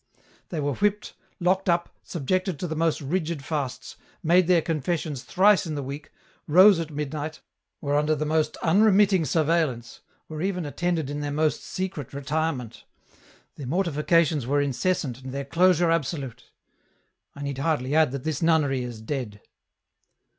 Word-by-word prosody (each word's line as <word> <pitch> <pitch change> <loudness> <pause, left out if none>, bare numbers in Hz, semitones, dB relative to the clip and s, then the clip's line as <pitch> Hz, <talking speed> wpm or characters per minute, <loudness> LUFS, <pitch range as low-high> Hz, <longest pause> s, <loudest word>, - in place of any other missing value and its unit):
They 165 - -3
were 145 -1 0
whipped, 210 +3 -1 0.3
locked 185 +2 +1
up, 170 0 0
subjected 185 +3 -2
to 180 - -4
the 160 - -4
most 160 -1 0
rigid 155 -1 -2
fasts, 140 -5 -4 0.3
made 175 +2 +4
their 175 -3 +4
confessions 155 -3 -2
thrice 195 +2 +3
in 155 - -3
the 145 - -3
week, 140 +3 -7 0.4
rose 185 +4 +7
at 165 -2 -4
midnight, 150 +1 -4 0.4
were 145 -1 0
under 150 +1 +2
the 155 +1 -2
most 155 0 0
unremitting 195 0 +4
surveillance, 150 -5 0 0.3
were 155 -1 -6
even 180 -2 -1
attended 160 -1 -2
in 145 - -4
their 145 0 -3
most 155 +1 0
secret 180 -9 -5
retirement; 140 -3 -3 0.7
their 140 - -6
mortifications 160 -3 +1
were 145 +2 +2
incessant 140 -2 -1
and 130 0 -7
their 140 +1 -4
closure 175 +2 +3
absolute. 140 -6 -3 0.9
I 140 - -7
need 140 -1 -4
hardly 140 -3 0
add 155 -2 +4
that 135 0 -5
this 155 -3 -2
nunnery 155 -5 +2
is 120 -3 -6
dead." 110 -4 -4
155 Hz, 155 wpm, -25 LUFS, 140-170 Hz, 0.9 s, rose